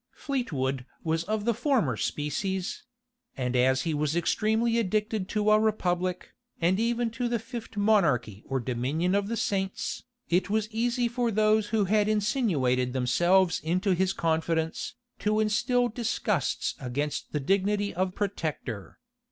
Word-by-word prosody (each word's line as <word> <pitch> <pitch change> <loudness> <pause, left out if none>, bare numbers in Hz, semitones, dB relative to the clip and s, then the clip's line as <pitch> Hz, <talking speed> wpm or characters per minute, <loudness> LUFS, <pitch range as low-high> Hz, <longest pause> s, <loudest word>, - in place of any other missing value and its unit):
Fleetwood 140 - -2 0.2
was 165 0 0
of 215 +1 -2
the 235 - +3
former 255 0 +1
species; 185 +6 -2 0.6
and 125 -1 -1
as 130 +1 +3
he 165 - -1
was 150 +1 0
extremely 220 +6 +1
addicted 210 -1 -1
to 210 -1 +2
a 215 - +6
republic, 185 -4 -1 0.3
and 180 +4 +2
even 235 0 0
to 245 +2 -2
the 235 0 0
fifth 225 -1 -8
monarchy 150 - +2
or 135 0 -1
dominion 130 +9 -1
of 200 0 +1
the 230 +1 -2
saints, 195 -2 -2 0.3
it 180 +2 +1
was 215 0 +1
easy 240 +2 +1
for 240 0 0
those 215 0 +3
who 210 -1 +1
had 210 +2 +2
insinuated 170 - +1
themselves 175 +9 +3
into 185 +5 0
his 185 +1 +1
confidence, 160 0 -1 0.2
to 215 +1 +1
instil 245 +3 +2
disgusts 235 +1 -1
against 140 +3 -3
the 150 - -1
dignity 200 +6 +1
of 185 +1 -1
protector. 155 - -4
195 Hz, 145 wpm, -28 LUFS, 160-220 Hz, 0.6 s, a